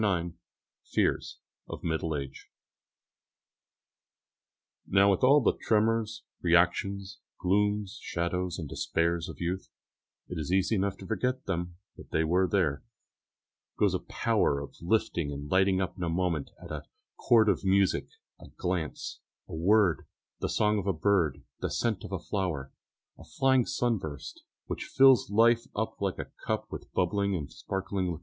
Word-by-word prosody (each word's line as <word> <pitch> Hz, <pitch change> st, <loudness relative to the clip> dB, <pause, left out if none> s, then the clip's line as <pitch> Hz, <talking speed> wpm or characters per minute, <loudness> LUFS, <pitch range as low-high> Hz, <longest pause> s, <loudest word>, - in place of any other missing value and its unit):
IX 90 Hz, -4 st, +1 dB, 0.6 s
FEARS -, -, +1 dB, 0.3 s
OF -, -, -7 dB
MIDDLE 80 Hz, -1 st, -1 dB
AGE 70 Hz, -2 st, -7 dB, 2.4 s
Now 100 Hz, +1 st, +5 dB
with 95 Hz, -, 0 dB
all 140 Hz, +3 st, +7 dB
the -, -, +4 dB
tremors, 110 Hz, 0 st, +1 dB, 0.2 s
reactions, 95 Hz, +6 st, +2 dB, 0.2 s
glooms, 105 Hz, +1 st, +1 dB
shadows, 90 Hz, +1 st, -2 dB
and 80 Hz, -5 st, -5 dB
despairs 85 Hz, +4 st, -1 dB
of 80 Hz, -, -9 dB
youth 90 Hz, +2 st, -3 dB, 0.6 s
it 90 Hz, -, -5 dB
is 75 Hz, +2 st, -3 dB
easy 95 Hz, +3 st, +2 dB
enough 100 Hz, -1 st, 0 dB
to 95 Hz, -, -10 dB
forget 125 Hz, +6 st, -1 dB
them, 85 Hz, -2 st, -3 dB, 0.2 s
but -, -, -13 dB
they 80 Hz, -, +1 dB
were 90 Hz, +4 st, +2 dB
there 80 Hz, -8 st, +1 dB, 1.0 s
goes -, -, +3 dB
a -, -, 0 dB
power 70 Hz, -, +1 dB
of 70 Hz, -, -8 dB
lifting 85 Hz, -5 st, 0 dB
and 70 Hz, +1 st, -6 dB
lighting 95 Hz, 0 st, +4 dB
up 95 Hz, -1 st, -2 dB
in 90 Hz, -, -4 dB
a 85 Hz, -, 0 dB
moment 85 Hz, -4 st, -1 dB
at -, -, -10 dB
a -, -, -5 dB, 0.3 s
chord 110 Hz, -2 st, +4 dB
of 100 Hz, -3 st, +2 dB
music, 95 Hz, 0 st, +2 dB, 0.3 s
a -, -, -12 dB
glance, 90 Hz, -4 st, -3 dB, 0.3 s
a -, -, -10 dB
word, 95 Hz, +2 st, +3 dB, 0.3 s
the -, -, -2 dB
song 105 Hz, 0 st, +2 dB
of 100 Hz, -, -5 dB
a 100 Hz, -, +2 dB
bird, 80 Hz, -5 st, +1 dB, 0.2 s
the -, -, -2 dB
scent 115 Hz, -5 st, -1 dB
of -, -, -8 dB
a 95 Hz, -, -1 dB
flower, 85 Hz, -8 st, -3 dB, 0.5 s
a -, -, -11 dB
flying 130 Hz, -2 st, +2 dB
sunburst, 90 Hz, -, -2 dB, 0.2 s
which -, -, -4 dB
fills 135 Hz, -6 st, +5 dB
life 115 Hz, +3 st, +4 dB
up 110 Hz, 0 st, -3 dB
like 100 Hz, -2 st, -1 dB
a -, -, -6 dB
cup -, -, -1 dB
with -, -, -8 dB
bubbling 100 Hz, +2 st, +1 dB
and 75 Hz, -5 st, -4 dB
sparkling 95 Hz, -1 st, -3 dB
liquor. 85 Hz, -3 st, -3 dB
95 Hz, 155 wpm, -29 LUFS, 85-105 Hz, 2.4 s, all